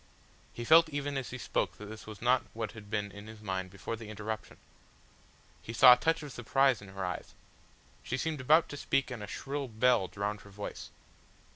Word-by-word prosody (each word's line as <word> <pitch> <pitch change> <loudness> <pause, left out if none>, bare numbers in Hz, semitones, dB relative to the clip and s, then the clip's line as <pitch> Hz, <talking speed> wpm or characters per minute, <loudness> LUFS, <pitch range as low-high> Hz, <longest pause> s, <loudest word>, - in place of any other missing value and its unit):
He 120 - -6
felt 165 +4 +7
even 145 -1 -3
as 135 -2 -3
he 130 - -6
spoke - - -1
that 105 - -9
this 110 +1 -10
was 110 0 -9
not 125 +1 +4
what 115 -2 -3
had 105 -2 -12
been 105 -1 -2
in 100 +1 -10
his 110 0 -10
mind 95 -3 -3
before 100 +4 -5
the 110 -1 -9
interruption. 110 +1 -5 1.0
He 115 - -7
saw 125 +1 +10
a - - +5
touch 165 +4 0
of 145 - -7
surprise 130 0 +2
in 100 - -11
her 95 0 -5
eyes. 90 - -5 0.7
She 120 - -3
seemed 155 0 -2
about 155 +6 +5
to 145 - -6
speak 135 -1 0
and 120 -4 -5
a 105 - -6
shrill 140 +5 -4
bell 115 -3 +3
drowned 100 +3 -3
her 100 - -14
voice. 100 +1 -7
110 Hz, 210 wpm, -31 LUFS, 105-135 Hz, 1.0 s, saw